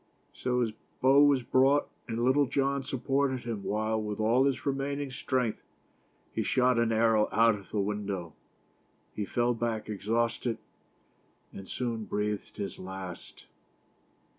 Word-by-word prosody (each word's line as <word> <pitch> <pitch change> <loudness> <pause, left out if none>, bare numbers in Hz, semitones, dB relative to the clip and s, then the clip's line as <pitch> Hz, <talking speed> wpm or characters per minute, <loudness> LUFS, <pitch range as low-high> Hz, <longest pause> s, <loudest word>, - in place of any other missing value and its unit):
So 125 -1 0
his 115 -2 0 0.3
bow 135 +2 +6
was 140 -3 +4
brought, 135 +4 +3 0.2
and 115 0 -1
Littlejohn 140 +1 +2
supported 135 0 0
him 115 -4 -4
while, 110 +1 0
with 105 0 -4
all 115 +5 +3
his 135 -2 0
remaining 140 0 -2
strength, 125 -3 -1 0.7
he - - 0
shot 125 -1 +3
an 115 -1 +2
arrow 110 -1 +3
out 115 0 +5
of 100 -2 -9
the 105 - -2
window. 100 -5 -3 0.8
He 105 - -3
fell 120 +3 +1
back 115 -2 -2
exhaust 115 +4 -1
ed, 115 -2 -1 1.0
and 95 - -9
soon 115 -3 -3
breathed 105 0 -3
his 100 -2 -5
last. 95 -1 -8
115 Hz, 140 wpm, -29 LUFS, 105-130 Hz, 1.0 s, bow